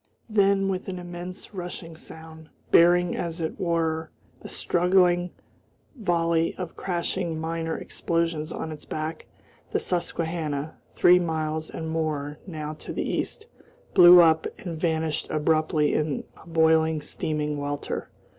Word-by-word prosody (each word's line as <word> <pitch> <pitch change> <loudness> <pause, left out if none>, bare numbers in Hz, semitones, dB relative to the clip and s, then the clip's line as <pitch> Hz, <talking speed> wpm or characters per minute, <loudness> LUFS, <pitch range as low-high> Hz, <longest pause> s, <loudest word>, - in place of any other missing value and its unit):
Then, 200 -2 +3
with 190 -1 -2
an 185 -1 -4
immense 175 +2 -8
rushing 175 -3 -6
sound, 160 -1 -11 0.2
bearing 175 +1 +5
as 170 -1 -3
it 160 -1 -3
were 165 -2 0 0.3
a - - -9
straggling 180 0 +2 0.7
volley 170 -6 +1
of 180 -3 -6
crashing 175 -2 -2
minor 165 0 -2
explosions 165 -2 -2
on 160 - -4
its 150 -1 -8
back, 155 +1 -5 0.4
the - - +2
Susquehanna, 160 -4 -2
three 180 0 +5
miles 160 -2 -2
and 160 - -5
more 150 -2 -2
now 155 -3 -5
to - - -7
the - - -2
east, 435 - -3 0.5
blew 180 -1 +10
up 160 -1 +4
and 170 -7 -6
vanished 160 -2 0
abruptly 155 0 +2
in 150 -3 0
a - - -17
boiling, 160 -1 +3
steaming 150 0 -2
welter. 145 0 -4
165 Hz, 130 wpm, -26 LUFS, 155-175 Hz, 0.7 s, blew